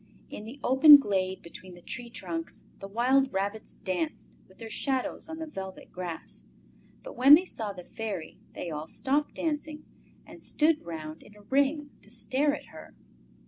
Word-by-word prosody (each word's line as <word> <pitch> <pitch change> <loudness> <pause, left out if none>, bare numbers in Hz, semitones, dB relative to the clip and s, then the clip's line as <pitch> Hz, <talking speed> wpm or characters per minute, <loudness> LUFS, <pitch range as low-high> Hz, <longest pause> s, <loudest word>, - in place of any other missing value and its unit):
In 210 - -7
the 245 +6 -9
open 290 +3 +10
glade 190 -7 -1
between 180 +2 -11
the 175 - -14
tree 245 -2 -6
trunks 330 +7 -6 0.2
the 195 - -7
wild 255 +6 +2
rabbits 200 +3 -3
danced 180 -4 -3 0.2
with 190 - -21
their 225 - -8
shadows 265 +5 -2
on 320 - -5
the 320 - -4
velvet 190 -11 -8
grass, 175 -3 -7 0.6
but - - -9
when 275 +4 +9
they 355 +4 +1
saw 220 - -4
the 180 -2 -10
Fairy 200 -5 -6
they 170 - -5
all 150 +1 -5
stopped 285 - -1
dancing 305 -1 -3 0.4
and - - -13
stood 310 0 +2
round 160 -2 -7
in 210 - -17
a 210 - -16
ring 280 +5 +1
to - - -19
stare 260 +6 0
at - - -11
her. - - -12
230 Hz, 175 wpm, -29 LUFS, 190-290 Hz, 0.6 s, open